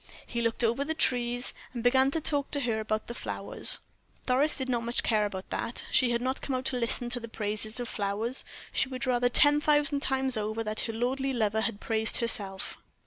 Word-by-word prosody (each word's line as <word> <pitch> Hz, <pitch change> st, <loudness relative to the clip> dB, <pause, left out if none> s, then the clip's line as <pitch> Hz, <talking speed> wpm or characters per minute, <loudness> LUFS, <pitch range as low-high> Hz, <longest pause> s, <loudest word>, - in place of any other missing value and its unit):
He 235 Hz, -, -3 dB
looked 230 Hz, +1 st, 0 dB
over 235 Hz, +4 st, +1 dB
the 320 Hz, +2 st, -3 dB
trees, 245 Hz, -4 st, 0 dB, 0.2 s
and 235 Hz, -, -4 dB
began 260 Hz, +2 st, +4 dB
to 325 Hz, -, -1 dB
talk 285 Hz, -2 st, 0 dB
to 285 Hz, -, +1 dB
her 230 Hz, -4 st, 0 dB
about 215 Hz, 0 st, -2 dB
the 235 Hz, -, -7 dB
flowers. -, -, +2 dB, 0.4 s
Doris 275 Hz, +4 st, +3 dB
did 265 Hz, -2 st, -2 dB
not 240 Hz, -2 st, 0 dB
much 235 Hz, +1 st, 0 dB
care 215 Hz, -2 st, +2 dB
about 190 Hz, -1 st, -8 dB
that 230 Hz, -, -2 dB
she 255 Hz, -, +5 dB
had 235 Hz, 0 st, 0 dB
not 260 Hz, +1 st, -2 dB
come 270 Hz, -, -2 dB
out 255 Hz, 0 st, -3 dB
to 260 Hz, -, +2 dB
listen 240 Hz, 0 st, 0 dB
to 245 Hz, -, -3 dB
the 230 Hz, -, -8 dB
praises 215 Hz, +1 st, -3 dB
of 245 Hz, -, -3 dB
flowers; 210 Hz, +5 st, -1 dB, 0.3 s
she 265 Hz, -, +1 dB
would 260 Hz, +1 st, -4 dB
rather 245 Hz, -1 st, +2 dB
ten 290 Hz, +4 st, +6 dB
thousand 295 Hz, -1 st, +2 dB
times 265 Hz, -2 st, +1 dB
over 215 Hz, +1 st, -2 dB
that 215 Hz, 0 st, -2 dB
her 225 Hz, -, -4 dB
lordly 265 Hz, +4 st, -1 dB
lover 220 Hz, -2 st, 0 dB
had 220 Hz, -2 st, -1 dB
praised 220 Hz, 0 st, 0 dB
herself. 205 Hz, -5 st, -1 dB
240 Hz, 215 wpm, -29 LUFS, 220-265 Hz, 0.4 s, ten